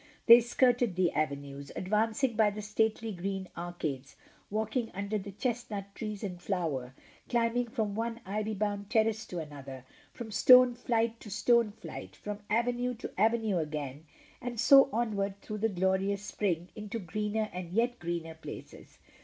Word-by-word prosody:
They 235 0 +11
skirted 240 -3 +2
the 180 -2 +2
avenues, 140 -2 -3
advancing 220 +5 +1
by 215 -1 +4
the 210 +1 -6
stately 220 +1 0
green 190 0 -4
arcades, 155 -6 -5 0.3
walking 220 +3 -1
under 200 +2 -2
the 200 +1 -7
chestnut 210 -3 -3
trees 215 -1 -5
in 180 -3 -4
flower, 160 -9 -2 0.3
climbing 240 0 +1
from 220 -4 -2
one 230 +2 -2
ivy 215 +2 -2
bound 205 0 -2
terrace 220 -1 +1
to 180 - -6
an 155 -3 -5
other— 135 -2 -9 0.3
from 225 -2 -8
stone 250 +3 +7
flight 230 -1 0
to 210 - -10
stone 230 +2 +3
flight, 210 - -9
fi:om 210 0 -6
avenue 245 +2 +1
to 230 - -7
avenue 220 -2 +2
again, 150 -1 -4 0.4
and 240 -2 -4
so 275 +3 +7
onward 205 -4 -1
through 215 +1 -6
the 225 +2 +2
glorious 190 +1 0
spring 180 -4 -2
into 210 +1 -5
greener 210 +3 -2
and 180 -1 -6
yet 240 +4 +1
greener 170 -1 -3
places. 160 - -10
210 Hz, 155 wpm, -31 LUFS, 180-230 Hz, 0.4 s, They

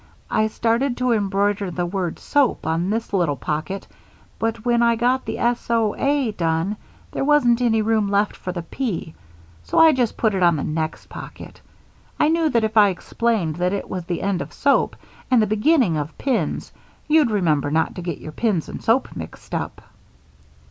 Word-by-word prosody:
I 215 -1 +2
started 235 +4 0
to 250 0 +1
embroider 200 -2 +1
the 175 0 -2
word 180 -1 -3
soap 285 -4 +1
on 165 +3 0
this 225 0 -2
little 170 -7 +1
pocket, 155 +8 -4 0.5
but 225 0 -2
when 240 -1 +3
I 235 0 +4
got 250 +3 +1
the - - -4
S 240 0 -1
O 225 -3 +2
A 280 -4 +1
done, 170 +2 -1 0.3
there - - -2
wasn't 270 -5 +3
any 225 -3 +2
room 215 -2 +1
left 205 +1 +1
for 180 - -5
the 175 -2 -5
P, 175 - -4 0.5
so - - -4
I 325 -1 +8
just 245 -4 0
put 220 -3 +2
it 190 - -1
on 170 -2 +5
the 145 - -2
next 155 0 -3
pocket. - - -10 0.6
I 300 - +4
knew 325 -1 +2
that 235 -5 +2
if 220 +1 -1
I 205 -1 +7
explained 190 -3 -1
that 180 +2 0
it 200 - -3
was 180 -2 -4
the 175 -1 -3
end 195 -4 0
of 140 +2 -7
'Soap' 280 0 +2 0.3
and 255 -2 +5
the 215 - +4
beginning 215 - +2
of 150 +1 -5
'Pins' 265 -4 -1 0.4
you'd 305 -4 +4
remember 160 -9 +1
not 160 +2 +1
to 180 - -7
get 170 -3 -4
your 155 - -9
pins 190 -1 0
and - - -7
soap 235 +4 +1
mixed - - -9
up." - - -4
210 Hz, 190 wpm, -22 LUFS, 175-235 Hz, 0.6 s, I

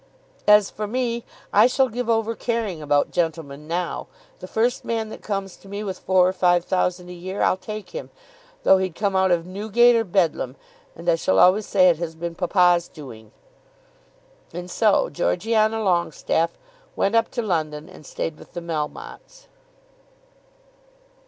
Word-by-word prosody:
"As 210 -1 +6
for 210 0 -4
me 235 0 -2 0.3
I 210 +4 +7
shall 260 +1 +2
give 245 0 -4
over 225 0 +1
caring 225 -8 -3
about 145 -1 +1
gentlemen 155 -4 -3
now. 175 +1 -3 0.3
The 185 - -8
first 235 +5 0
man 225 -1 -2
that - - -9
comes 195 -3 -4
to - - -18
me 200 +1 -5
with 190 -3 -5
four 185 -1 +3
or 185 - 0
five 175 -2 +2
thousand 180 -1 -1
a - - -7
year, 185 +3 -4
I'll - - +3
take 215 +2 -8
him, - - -7 0.5
though 190 - +6
he'd 185 -3 -2
come 200 -2 -1
out 190 0 +3
of 170 -2 +1
Newgate 220 +6 +3
or 230 - +2
Bedlam. 170 - 0 0.4
And 170 +1 -11
I 170 - +5
shall 160 -12 +1
always 190 - +5
say 185 -2 +4
it 170 -3 +4
has 165 -2 -4
been 170 +1 -5
papa's 175 0 +3
doing." 115 -8 -12 1.2
And 180 +1 -7
so 215 0 +3
Georgiana 220 +5 +1
Longestaffe 175 -3 0 0.4
went 200 - +1
up 230 0 +3
to 240 - -3
London 155 -6 -2
and - - -14
stayed 155 +1 -5
with - - -15
the - - -4
Melmottes. 170 - -6
185 Hz, 165 wpm, -23 LUFS, 170-215 Hz, 1.2 s, I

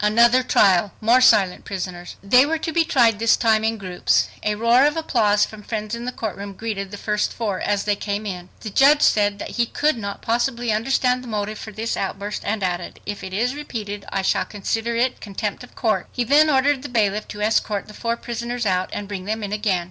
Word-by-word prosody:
Another 235 +4 +5
trial! 195 -5 +3
More 235 +4 +4
silent 200 -7 +4
prisoners! 180 -2 -6
They 250 +6 +6
were 320 +3 0
to 325 +1 -4
be 330 +1 +3
tried 240 -9 +3
this 230 0 +4
time 220 -2 +2
in 225 0 0
groups. 185 -3 0
A 210 0 0
roar 230 +4 +4
of 295 - -2
applause 215 -10 +2
from 215 -1 -11
friends 215 0 -5
in 235 +1 -4
the 250 - -2
courtroom 200 -3 -5
greeted 200 -1 -4
the 205 - -8
first 210 0 -1
four 210 -5 -3
as 205 -1 0
they 205 -1 +1
came 205 +1 -4
in. 180 -3 -6
The 215 - -6
judge 290 +6 +5
said 205 -1 +3
that - - -7
he 235 -1 +2
could 300 +1 0
not 200 -2 -6
possibly 235 0 0
understand 250 +3 +1
the - - -10
motive 215 -1 -3
for 215 - -8
this 220 +2 -3
outburst, 200 +2 -4
and 205 -1 -2
added, 175 -1 -3
"If 205 -1 -5
it 190 - -6
is 235 +7 0
repeated, 215 -8 -6
I 195 -1 -2
shall - - +2
consider 225 +3 -3
it 245 +2 0
contempt 205 +2 -4
of 250 - -15
court." 220 -3 0
He 245 - -1
then 295 +6 +4
ordered 275 -1 +2
the 285 - -7
bailiff 210 -3 0
to 210 - -8
escort 210 -1 0
the 210 - -12
four 230 +2 -2
prisoners 240 0 -4
out 185 -2 0
and 205 - -5
bring 195 -2 -6
them 220 +1 -3
in 205 0 -4
again. 210 -3 +1
215 Hz, 225 wpm, -22 LUFS, 200-240 Hz, -, They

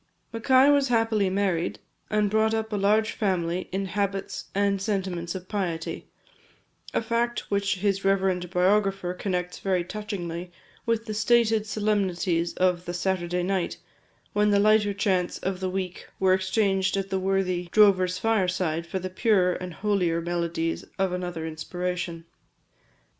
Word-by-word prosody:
Mackay 260 +4 +5
was 285 -1 +3
happily 225 -4 +2
married, 185 -3 0 0.3
and 210 -1 +1
brought 220 +1 +2
up 220 0 -3
a - - +1
large 210 +2 +2
family 185 -3 -1
in 195 +1 -1
habits 195 +1 -2
and 200 -1 +1
sentiments 190 -4 -2
of 185 -1 -7
piety; 175 -6 -3 0.8
a - - 0
fact 235 +1 -1
which 200 0 +1
his 195 +1 0
reverend 190 -2 +1
biographer 195 0 +1
connects 180 -1 -3
very 185 -2 0
touchingly 180 -3 -5 0.4
with 230 -1 +1
the 215 - -4
stated 220 0 +3
solemnities 190 -5 0
of 180 -1 +1
the 175 - -4
"Saturday 180 -1 -1
night," 185 -1 -1 0.6
when 210 0 +3
the 205 - +4
lighter 210 0 +4
chants 185 -3 0
of 190 -1 -3
the 185 -1 -2
week 185 -1 -4
were 190 -1 +4
exchanged 190 0 +1
at 195 0 -3
the 190 - +1
worthy 185 -2 0
drover's 185 -4 +4
fireside 185 -6 0
for 190 - -3
the 185 0 -3
purer 185 -1 +2
and 180 0 -6
holier 185 -5 +1
melodies 170 -1 -2
of 190 -1 +1
another 175 -3 -4
inspiration. 170 +1 -4
190 Hz, 145 wpm, -26 LUFS, 180-210 Hz, 0.8 s, Mackay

